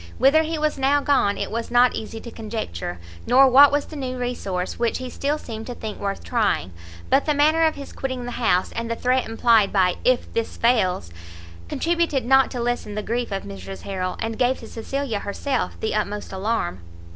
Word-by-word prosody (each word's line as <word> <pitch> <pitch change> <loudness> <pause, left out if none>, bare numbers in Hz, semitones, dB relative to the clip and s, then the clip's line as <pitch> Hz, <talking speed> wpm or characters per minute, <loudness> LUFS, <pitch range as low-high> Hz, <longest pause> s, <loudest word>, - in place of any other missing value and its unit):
Whither 290 +4 +5
he 320 0 -2
was 305 -2 -1
now 275 +2 +3
gone 275 -8 +2
it - - -3
was 230 +1 -3
not 245 +1 +4
easy 220 +1 -6
to 235 - -9
conjecture, 210 - -5 0.3
nor 270 +2 +7
what 275 +3 +8
was 290 0 +1
the - - -11
new 255 -3 -4
resource 200 -7 -3
which 235 -1 +1
he 255 -1 -6
still 290 +2 -1
seemed 225 -6 -8
to 245 - -5
think 220 -2 -6
worth 200 -1 -3
trying; 215 - 0 0.4
but 280 - +3
the 300 - +2
manner 310 +3 +4
of 315 - +1
his 280 -1 -9
quitting 260 -2 -4
the 245 - -5
house, 205 -7 +1
and 230 0 -4
the 230 - -1
threat 255 +2 +1
implied 225 -2 +3
by 185 -3 +2
if 255 -1 +1
this 230 -1 -2
fails, 185 - +1 0.6
contributed 335 - 0
not 265 +1 +5
to 250 - -5
lessen 240 -3 -2
the 210 - -3
grief 235 +1 -2
of 195 -1 -3
Mrs 195 -1 -8
Harrel, 185 -2 -3
and 225 0 -3
gave 255 +1 +2
to - - -9
Cecilia 235 -1 -3
herself 255 +7 -3
the 220 - -2
utmost 210 -1 -3
alarm. 190 - -1
240 Hz, 205 wpm, -23 LUFS, 210-270 Hz, 0.6 s, what